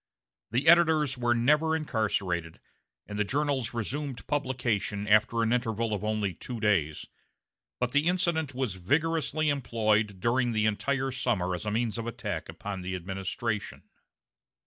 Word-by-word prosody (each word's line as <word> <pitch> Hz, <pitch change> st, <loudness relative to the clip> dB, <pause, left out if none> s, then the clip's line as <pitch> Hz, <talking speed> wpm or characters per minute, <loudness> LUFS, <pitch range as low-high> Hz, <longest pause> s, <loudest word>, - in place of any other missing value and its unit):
The 125 Hz, +7 st, 0 dB
editors 160 Hz, -5 st, +5 dB
were 120 Hz, -1 st, +1 dB
never 150 Hz, +7 st, +3 dB
incarcerated, 100 Hz, -, -1 dB, 0.5 s
and 105 Hz, 0 st, -6 dB
the -, -, +4 dB
journals 135 Hz, +1 st, 0 dB
resumed 130 Hz, +3 st, -4 dB
publication 120 Hz, -7 st, -1 dB
after 110 Hz, +2 st, +4 dB
an 115 Hz, +1 st, +2 dB
interval 115 Hz, -2 st, 0 dB
of 105 Hz, -, -3 dB
only 105 Hz, -3 st, 0 dB
two 120 Hz, +7 st, -7 dB
days, 95 Hz, -9 st, +1 dB, 0.7 s
but 125 Hz, 0 st, 0 dB
the 145 Hz, +4 st, +2 dB
incident 170 Hz, -6 st, +1 dB
was 130 Hz, -6 st, -1 dB
vigorously 155 Hz, -, 0 dB
employed 110 Hz, -6 st, +1 dB
during 120 Hz, +2 st, +1 dB
the 110 Hz, -1 st, +1 dB
entire 135 Hz, +5 st, 0 dB
summer 110 Hz, -8 st, 0 dB
as 90 Hz, +3 st, -4 dB
a -, -, 0 dB
means 115 Hz, +1 st, -1 dB
of 115 Hz, -, -4 dB
attack 105 Hz, -9 st, -4 dB
upon 95 Hz, +4 st, -6 dB
the 90 Hz, +1 st, -3 dB
administration. 95 Hz, +4 st, -4 dB
115 Hz, 145 wpm, -28 LUFS, 105-135 Hz, 0.7 s, editors